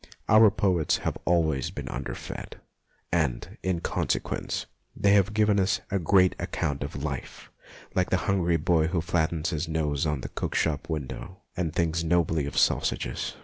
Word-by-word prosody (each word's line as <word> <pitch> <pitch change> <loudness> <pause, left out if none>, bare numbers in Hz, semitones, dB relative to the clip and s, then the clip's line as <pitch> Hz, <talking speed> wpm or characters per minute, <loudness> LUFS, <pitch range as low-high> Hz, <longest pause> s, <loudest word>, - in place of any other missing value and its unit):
Our 110 0 +7
poets 90 -5 +1
have - - 0
always 80 -6 +2
been - - -7
underfed, - - -6 0.6
and, 75 -8 -1
in 90 -3 -1
consequence, - - -2 0.3
they 100 - +3
have 100 0 +4
given 105 -1 +3
us 95 0 +2
a 100 - +1
great 95 +1 +4
account 70 -1 -2
of - - -5
life, - - -6 0.4
like, 90 - +1
the 95 - +3
hungry 85 -3 +2
boy 80 0 +2
who 85 +1 0
flattens 80 0 0
his 80 0 -2
nose 80 -2 0
on 75 -3 -1
the - - -6
cook - - -4
shop 80 0 0
window 80 +5 -5
and 90 -4 -1
thinks 85 0 0
nobly 80 -3 +1
of 70 - -6
sausages. - - +1
85 Hz, 160 wpm, -27 LUFS, 80-95 Hz, 0.6 s, Our